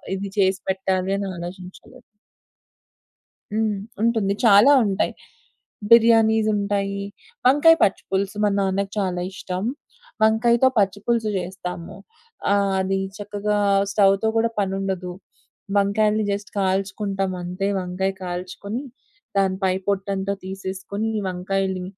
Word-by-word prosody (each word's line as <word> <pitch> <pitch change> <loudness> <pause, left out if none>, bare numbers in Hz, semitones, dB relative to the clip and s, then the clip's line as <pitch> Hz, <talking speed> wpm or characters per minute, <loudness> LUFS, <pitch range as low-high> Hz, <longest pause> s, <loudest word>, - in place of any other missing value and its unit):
ఇది 195 0 -5
చేసి 190 -1 +3
పెట్టాలి 190 0 0
అని 200 0 -3
ఆలోచించలేదు. 185 +8 -10 1.5
హ్మ్. 215 -1 0 0.2
ఉంటుంది 225 -4 +2
చాలా 210 +5 +7
ఉంటాయి. 195 -2 0 0.8
బిర్యానీసుంటాయి. 215 -3 +3 0.4
వంకాయ 295 +5 +6
పచ్చి 195 - +2
పులుసు 195 +2 -1
మా 210 - +4
నాన్నకి 195 0 -1
చాలా 180 -2 -1
ఇష్టం. 185 -1 -5 0.6
వంకాయతో 235 +3 +4
పచ్చి 200 -1 +2
పులుసు 230 -2 +1
చేస్తాము. 180 -1 -6 0.6
ఆహ్, 200 -1 +2
అది 190 0 0 0.2
చక్కగా 205 0 -2 0.3
స్టవ్‌తో 195 +1 +3
కూడా 230 +1 +2
పని 195 -1 0
ఉండదు 185 -2 -3 0.7
వంకాయలని 210 +2 +2
జస్ట్ 200 0 -4
కాల్చుకుంటాం 195 0 -1
అంతే. 180 +2 -3
వంకాయ 185 +1 -2
కాల్చుకొని, 185 +6 -5 0.6
దాని 190 -1 +2
పై 190 -1 +3
పొట్టంతా 195 0 -1
తీసేసుకొని 190 +3 -4 0.2
వంకాయలు, 185 0 -2
195 Hz, 105 wpm, -22 LUFS, 190-210 Hz, 1.5 s, చాలా